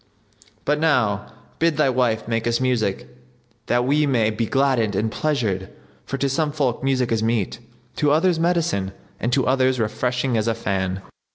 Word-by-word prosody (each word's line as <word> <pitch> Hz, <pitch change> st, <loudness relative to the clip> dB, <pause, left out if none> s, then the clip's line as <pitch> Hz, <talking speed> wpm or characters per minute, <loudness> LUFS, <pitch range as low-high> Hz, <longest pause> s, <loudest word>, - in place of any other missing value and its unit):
But 150 Hz, +1 st, +1 dB
now 125 Hz, -11 st, +1 dB, 0.3 s
bid 165 Hz, -2 st, +2 dB
thy 140 Hz, -3 st, +3 dB
wife 120 Hz, -4 st, 0 dB
make 115 Hz, 0 st, -1 dB
us 120 Hz, 0 st, +1 dB
music 120 Hz, -7 st, 0 dB, 0.6 s
that 120 Hz, 0 st, +2 dB
we 145 Hz, +3 st, +2 dB
may 115 Hz, -5 st, +2 dB
be 110 Hz, +1 st, -2 dB
gladdened 130 Hz, -6 st, +1 dB
and 110 Hz, +3 st, 0 dB
pleasured; 110 Hz, -12 st, -1 dB, 0.4 s
for 135 Hz, -, -3 dB
to 140 Hz, -, 0 dB
some 150 Hz, +3 st, 0 dB
folk 135 Hz, -5 st, -1 dB
music 130 Hz, -3 st, +1 dB
is 115 Hz, -1 st, +1 dB
meat, 115 Hz, 0 st, -1 dB, 0.4 s
to 150 Hz, -, +2 dB
others 165 Hz, +3 st, +3 dB
medicine 165 Hz, -, 0 dB, 0.3 s
and 120 Hz, -, -1 dB
to 130 Hz, 0 st, +2 dB
others 130 Hz, -1 st, +2 dB
refreshing 125 Hz, +3 st, 0 dB
as 110 Hz, +1 st, 0 dB
a 115 Hz, -, +1 dB
fan." 95 Hz, -3 st, -2 dB
125 Hz, 170 wpm, -22 LUFS, 110-140 Hz, 0.6 s, thy